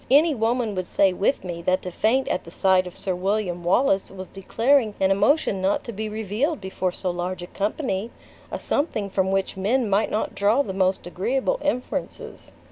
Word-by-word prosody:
Any 300 Hz, +4 st, +5 dB
woman 230 Hz, -2 st, 0 dB
would 185 Hz, -2 st, -3 dB
say 195 Hz, -2 st, +3 dB
with 195 Hz, +7 st, 0 dB
me, 175 Hz, -2 st, -5 dB
that 185 Hz, +2 st, +1 dB
to 180 Hz, -, -5 dB
faint 240 Hz, +9 st, +1 dB
at -, -, -1 dB
the -, -, -11 dB
sight 185 Hz, +1 st, +2 dB
of 180 Hz, -, -10 dB
Sir 190 Hz, -, -1 dB
William 180 Hz, -1 st, -1 dB
Wallace 195 Hz, +2 st, +2 dB
was 190 Hz, -1 st, -8 dB
declaring 225 Hz, +3 st, +1 dB
an 190 Hz, 0 st, +3 dB
emotion 200 Hz, 0 st, +2 dB
not 195 Hz, +2 st, +1 dB
to 245 Hz, -, -6 dB
be 215 Hz, 0 st, -4 dB
revealed 220 Hz, -, -1 dB
before 190 Hz, -1 st, -2 dB
so 180 Hz, 0 st, -3 dB
large 175 Hz, +1 st, -4 dB
a -, -, -4 dB
company! 205 Hz, -, -2 dB, 0.4 s
a -, -, -2 dB
something 215 Hz, -, -1 dB
from 190 Hz, 0 st, +1 dB
which 195 Hz, 0 st, 0 dB
men 225 Hz, +6 st, +1 dB
might 200 Hz, +2 st, +2 dB
not 215 Hz, -, -1 dB
draw 215 Hz, +7 st, +3 dB
the 190 Hz, -, -5 dB
most 190 Hz, -1 st, +1 dB
agreeable 230 Hz, +10 st, -1 dB
inferences." 270 Hz, -4 st, -3 dB
200 Hz, 195 wpm, -24 LUFS, 185-235 Hz, 0.4 s, Any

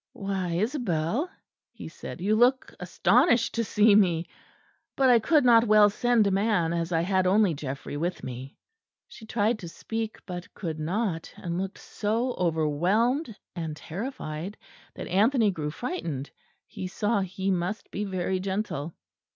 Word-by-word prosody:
"Why, 190 Hz, -3 st, -3 dB
Isabel," 215 Hz, -, -1 dB, 0.4 s
he -, -, -9 dB
said, -, -, -9 dB
"you 210 Hz, +4 st, +2 dB
look 250 Hz, +3 st, +3 dB
astonished 230 Hz, -, +3 dB
to 230 Hz, -, 0 dB
see 210 Hz, 0 st, +4 dB
me. 175 Hz, -5 st, +3 dB, 0.7 s
But 265 Hz, -2 st, +4 dB
I 235 Hz, -, +6 dB
could 290 Hz, +5 st, +3 dB
not 235 Hz, -1 st, +6 dB
well 210 Hz, -1 st, +6 dB
send 240 Hz, 0 st, +2 dB
a 200 Hz, -, +2 dB
man, 195 Hz, -4 st, +1 dB
as 170 Hz, 0 st, -2 dB
I 165 Hz, -1 st, +2 dB
had 185 Hz, +1 st, +1 dB
only 200 Hz, -1 st, +4 dB
Geoffrey 140 Hz, 0 st, -5 dB
with 175 Hz, +4 st, -3 dB
me." 130 Hz, +2 st, -7 dB, 0.5 s
She 220 Hz, -, -13 dB
tried 220 Hz, +1 st, +1 dB
to 170 Hz, -, -7 dB
speak, 225 Hz, +5 st, -4 dB
but 180 Hz, -1 st, -7 dB
could 160 Hz, -5 st, -4 dB
not; 170 Hz, +1 st, -2 dB
and 175 Hz, 0 st, -3 dB
looked 195 Hz, +1 st, -5 dB
so 230 Hz, +4 st, -2 dB
overwhelmed 185 Hz, -, +1 dB, 0.2 s
and 160 Hz, -3 st, -4 dB
terrified 185 Hz, -, -6 dB, 0.4 s
that -, -, -6 dB
Anthony 215 Hz, +3 st, +3 dB
grew 155 Hz, -5 st, -3 dB
frightened; 155 Hz, -, -4 dB, 0.3 s
he 185 Hz, -, -6 dB
saw 205 Hz, +3 st, 0 dB
he 190 Hz, 0 st, -2 dB
must 185 Hz, +4 st, -2 dB
be 205 Hz, -, -3 dB
very 185 Hz, -1 st, -1 dB
gentle. 190 Hz, -5 st, -3 dB
195 Hz, 150 wpm, -27 LUFS, 170-225 Hz, 0.7 s, I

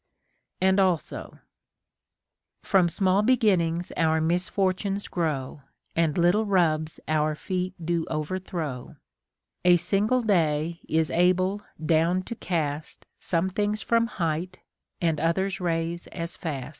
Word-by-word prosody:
f 190 Hz, -, +3 dB
And 190 Hz, +1 st, +4 dB
also: 185 Hz, -4 st, -1 dB, 0.6 s
— -, -, -55 dB
From 185 Hz, -4 st, +5 dB
small 190 Hz, +3 st, +2 dB
beginnings 190 Hz, -8 st, +2 dB
our 160 Hz, -1 st, +2 dB
misfortunes 185 Hz, +4 st, 0 dB
grow, 150 Hz, -5 st, -2 dB, 0.3 s
And 165 Hz, -1 st, +1 dB
little 180 Hz, +5 st, +3 dB
rubs 160 Hz, -5 st, +1 dB
our 155 Hz, 0 st, +1 dB
feet 185 Hz, +3 st, -3 dB
do 165 Hz, 0 st, -1 dB
overthrow; 155 Hz, -4 st, -4 dB, 0.7 s
A 180 Hz, -1 st, +6 dB
single 205 Hz, +8 st, +1 dB
day 165 Hz, -5 st, +1 dB
is 160 Hz, 0 st, +1 dB
able 185 Hz, +3 st, +2 dB, 0.2 s
down 170 Hz, +3 st, +2 dB
to 235 Hz, -, -6 dB
cast 155 Hz, -6 st, -3 dB
Some 180 Hz, +2 st, 0 dB
things 210 Hz, +2 st, -1 dB
from 230 Hz, 0 st, +2 dB
height, 175 Hz, -2 st, -2 dB, 0.4 s
and 165 Hz, -3 st, +1 dB
others 190 Hz, +4 st, 0 dB
raise 170 Hz, 0 st, -2 dB
as 170 Hz, 0 st, -6 dB
fast. 140 Hz, -6 st, -4 dB
175 Hz, 120 wpm, -26 LUFS, 160-190 Hz, 0.7 s, A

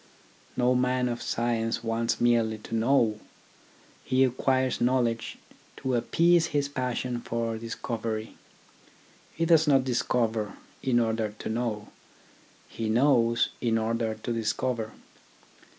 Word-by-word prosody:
No 125 Hz, 0 st, +3 dB
man 125 Hz, 0 st, +1 dB
of 120 Hz, -1 st, -3 dB
science 115 Hz, -1 st, -1 dB
wants 115 Hz, 0 st, -1 dB
merely 115 Hz, -2 st, +2 dB
to 105 Hz, -, -10 dB
know. 115 Hz, -2 st, +2 dB, 0.8 s
He 130 Hz, +1 st, +3 dB
acquires 130 Hz, 0 st, +1 dB
knowledge 120 Hz, -2 st, 0 dB, 0.4 s
to 130 Hz, -, -2 dB
appease 165 Hz, +7 st, +3 dB
his 145 Hz, -1 st, 0 dB
passion 125 Hz, -2 st, -3 dB
for 115 Hz, -1 st, -2 dB
discovery. 110 Hz, -1 st, -4 dB, 1.0 s
He 165 Hz, -, 0 dB
does 160 Hz, -2 st, +4 dB
not 135 Hz, -2 st, +5 dB
discover 115 Hz, -4 st, 0 dB, 0.3 s
in 125 Hz, -3 st, +2 dB
order 110 Hz, -2 st, -1 dB
to -, -, -5 dB
know, 110 Hz, -2 st, -2 dB, 0.8 s
he 110 Hz, -1 st, -4 dB
knows 120 Hz, -1 st, +3 dB
in 115 Hz, -2 st, +1 dB
order 115 Hz, 0 st, -1 dB
to 115 Hz, +2 st, -4 dB
discover. 115 Hz, 0 st, -2 dB
120 Hz, 120 wpm, -27 LUFS, 115-130 Hz, 1.0 s, not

